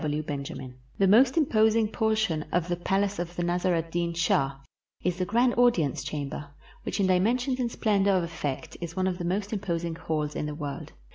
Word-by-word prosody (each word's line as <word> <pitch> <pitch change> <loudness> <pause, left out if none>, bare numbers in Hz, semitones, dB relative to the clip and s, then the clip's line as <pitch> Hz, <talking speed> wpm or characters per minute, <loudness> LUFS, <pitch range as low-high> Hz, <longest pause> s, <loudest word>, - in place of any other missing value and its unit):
G. - - -3
W. 150 +1 -1
BENJAMIN 140 -3 -5 0.2
The 195 - +4
most 245 - +5
imposing 220 -6 +3
portion 215 -8 0
of 175 -1 +1
the 175 - +1
palace 195 +3 0
of 175 0 -4
the 175 - -1
Nasr 175 +1 +1
ed 165 0 -2
Deen 170 0 -1
Shah 140 -5 +1 0.5
is 180 -1 0
the 185 - 0
grand 240 +5 +3
audience 170 - +3
chamber, 145 0 -5 0.3
which - - -4
in 195 - +3
dimensions 240 +8 +2
and 240 -2 0
splendor 200 -4 +2
of 185 -3 +3
effect 155 -5 -4
is 170 -1 -5
one 185 -1 0
of 185 -1 -1
the 175 - -3
most 195 +4 -1
imposing 170 -5 -2
halls 155 -3 -3
in 150 - -2
the. 150 - -5
world. 145 -2 -6
175 Hz, 205 wpm, -27 LUFS, 160-210 Hz, 0.5 s, most